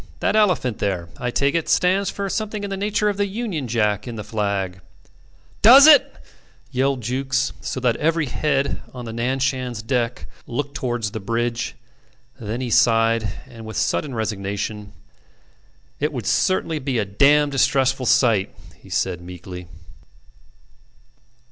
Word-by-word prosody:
That - - +1
elephant 180 - +2
there, 90 -4 -2
I 125 - -2
take 140 +3 +1
it, 165 -2 -1
stands 190 +2 +2
for 200 0 -4
something 210 +1 -3
in 200 - -4
the - - -1
nature 210 +2 0
of 205 -1 0
the 205 0 +1
Union 195 - -4
Jack 105 -3 0
in 120 - -5
the 105 - -6
flag... 100 -4 -2 0.4
." - - -32
"Does 260 +7 +9
it!" 310 -2 +6 0.6
yelled 135 0 0
Jukes, 130 +3 -1
so - - -4
that 120 -2 +1
every 165 0 +1
head 140 +1 -1
on 125 -1 -7
the 115 - -6
Nan 120 +3 -1
Shan's 130 -4 -2
decks 120 0 -1 0.2
looked 140 +4 -3
towards 120 -6 -2
the 110 - -5
bridge. 115 +3 -2 0.6
Then 115 +3 -4
he 125 -2 -3
sighed, 115 -2 +3 0.2
and 115 -1 -12
with 110 0 -7
sudden 140 -5 -1
resignation: 105 -1 -4 1.1
"It - - 0
would - - -5
certainly 165 -4 +1
be 135 -3 -2
a 110 - 0
dam' 145 +9 +3
distressful 135 -1 +2
sight," 110 -7 +3 0.2
he - - -17
said, 85 - -1
meekly. 90 0 -9
125 Hz, 155 wpm, -22 LUFS, 110-145 Hz, 1.1 s, Does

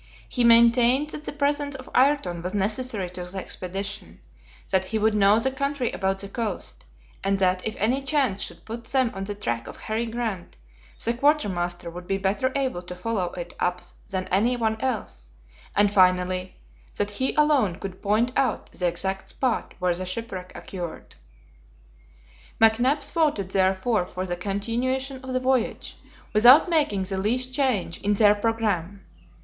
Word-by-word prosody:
He 245 - 0
maintained 235 +5 +5
that 300 - -8
the - - -3
presence 290 0 -1
of 260 -1 -9
Ayrton 255 -11 +2
was 180 +3 -4
necessary 210 0 -1
to 180 0 -6
the 180 +2 -8
expedition, 185 - -5 0.5
that 190 0 +2
he 220 +4 -2
would 215 0 +2
know 205 +1 +5
the 265 +3 0
country 280 -2 -1
about 195 0 -1
the 200 - -6
coast, 220 +2 -5 0.4
and 195 0 +1
that 185 -1 +2
if 220 - -4
any 245 +7 +1
chance 270 -8 0
should - - -7
put 230 +1 -7
them 260 -3 +1
on 195 0 -5
the 205 +1 -5
track 120 - -3
of - - -9
Harry 225 +2 -2
Grant, 225 -6 -4 0.5
the 235 - +1
quartermaster 185 - 0
would 175 +1 -9
be 195 - 0
better 200 +7 0
able 260 -10 -1
to 180 0 -8
follow 185 -1 -2
it 175 -1 -6
up 180 0 0 0.3
than 185 -1 -3
any 230 +7 +2
one 220 -1 -1
else, 215 - -3 0.5
and, 205 0 +3
finally, 185 -1 +2 0.4
that 205 0 -1
he 260 +6 -1
alone 290 - +3
could 190 0 -8
point 220 +5 +2
out 265 - 0
the 180 - -1
exact 190 +3 -2
spot 255 -4 -2
where 180 -1 +1
the 185 +1 -4
shipwreck 185 -2 -4
occurred. 175 -4 -7 1.5
McNabbs 240 +6 +3
voted 295 - +1
therefore 190 +1 +1
for 185 +1 -4
the 175 -1 -2
continuation 245 +8 -2
of 260 - -6
the 255 - +1
voyage, 255 -2 0 0.4
without 250 +10 +7
making 290 - +2
the 190 0 -3
least 250 +6 0
change 255 - 0
in 205 +1 +1
their 205 0 +6
programme. 205 -4 -1
210 Hz, 165 wpm, -25 LUFS, 185-255 Hz, 1.5 s, without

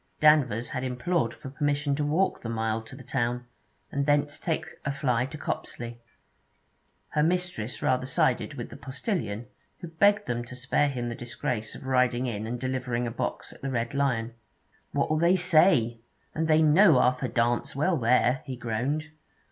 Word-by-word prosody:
Danvers 135 -7 +4
had 130 -3 -3
implored 130 +1 0
for 130 +2 -9
permission 145 0 0
to 150 +1 -1
walk 160 +6 +1
the 115 - -5
mile 110 -1 -1
to 110 +3 -11
the 130 - -11
town, 120 0 -1 0.5
and 140 +1 -1
thence 145 0 +2
take 160 -2 -1 0.2
a 140 - -1
fly 130 -3 0
to 155 - -8
Copsley. 120 -5 -5 1.1
Her 150 - +1
mistress 170 -8 -1
rather 130 0 +1
sided 130 - +1
with - - -6
the - - -9
postillion; 130 - -3 0.4
who 175 - -6
begged 200 +6 +3
them 120 -1 -2
to 125 - -10
spare 130 +3 +1
him 125 -3 -3
the 120 - -3
disgrace 120 -1 -4
of - - -10
riding 125 -1 +2
in 110 -3 -3
and 120 +1 -3
delivering 125 -2 -2
a 120 - -3
box 115 - -4
at - - -17
the 135 - -3
Red 120 -1 -2
Lion. 125 -5 0 0.6
'What'll 155 0 +1
they 170 +3 +4
say? 160 -10 +4 0.3
And 160 +1 -1
they 160 0 +5
know 155 0 +6
Arthur 125 +1 +2
Dance 120 +1 0
well 155 +5 +2
there,' 125 +1 +3
he 130 - -5
groaned. 125 +7 -2
130 Hz, 175 wpm, -27 LUFS, 120-150 Hz, 1.1 s, know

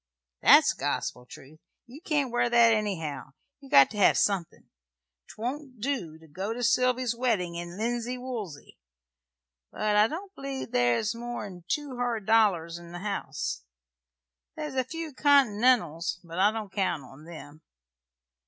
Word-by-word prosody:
"That's - - +7
gospel 125 0 -3
truth. 155 +2 -14 0.3
You 260 +6 -13
can't 295 - 0
wear 240 0 +1
that, 235 -1 +5
anyhow. 165 - -3 0.3
You've 275 -1 -15
got 135 -1 +7
to 215 - -7
hev 200 - +5
somethin'. 195 -5 -1 0.6
'Twon't 255 +2 -6
do 210 - -3
to 160 0 -18
go 190 +8 -4
to 245 +1 -5
Sylvy's 250 0 +2
weddin' 225 -8 -1
in 175 +1 -7
linsey 240 +2 -2
woolsy; 225 - -7 0.9
but 210 -1 -1
I 210 +1 +5
don't 375 - -7
believe 275 -4 -6
there's 120 - +1
more'n 220 -7 -7
two 285 0 -3
hard 240 -4 -2
dollars 185 -7 +2
in 170 0 -12
the - - -5
house. 200 - -4 0.9
There's 300 -2 -5
a 260 -1 +1
few 320 +3 -7
Continentals; 235 - +3
but 170 +1 -7
I 200 +2 +5
don't 215 -3 -6
count 175 -7 -1
on 135 +4 -14
them. 155 -2 -11
215 Hz, 145 wpm, -27 LUFS, 170-250 Hz, 0.9 s, That's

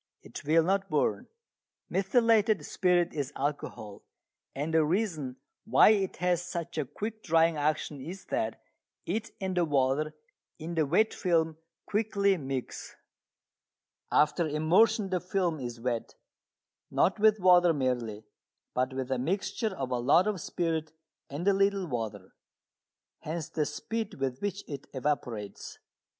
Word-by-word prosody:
It - - -9
will 160 +2 +4
not 195 +3 0
burn. - - 0 0.6
Methylated 215 +1 +3
spirit 175 -1 +2
is 145 -2 -3
alcohol, 135 -7 -4 0.5
and 150 +4 -3
the 160 -1 +5
reason 155 - -1 0.3
why 220 - +6
it 200 -3 +1
has 175 0 +1
such 170 -2 -4
a 150 - 0
quick 215 - -6
drying 165 -1 +3
action 150 -1 -1
is 180 +7 -8
that 110 0 -2 0.4
it 215 +6 -2
and 190 -1 -2
the 175 - +3
water 145 0 +1 0.4
in 165 +2 -6
the 160 -3 +1
wet 215 +9 +3
film 165 -3 +1 0.3
quickly 200 -2 +1
mix. 135 -5 -5 1.2
After 155 +3 +3
immersion 190 +7 +3
the 180 - +1
film 180 -3 -1
is 120 -2 -6
wet, 120 -1 -3 0.7
not 195 - +2
with 215 0 +5
water 180 -2 +6
merely, 125 -7 -1 0.5
but 130 +1 0
with 130 0 -3
a 130 - +1
mixture 195 - -1
of 130 -2 -3
a 125 - 0
lot 140 +9 +4
of 210 -5 -1
spirit 160 -2 -2 0.4
and 150 +7 -4
a 200 - +6
little 195 0 +2
water. 110 - -5 0.9
Hence 160 0 -5
the 150 -2 -1
speed 225 -2 -4
with 135 -2 -3
which 200 0 -3
it 140 -2 -7
evaporates. 125 -7 -3
165 Hz, 140 wpm, -29 LUFS, 135-195 Hz, 1.2 s, why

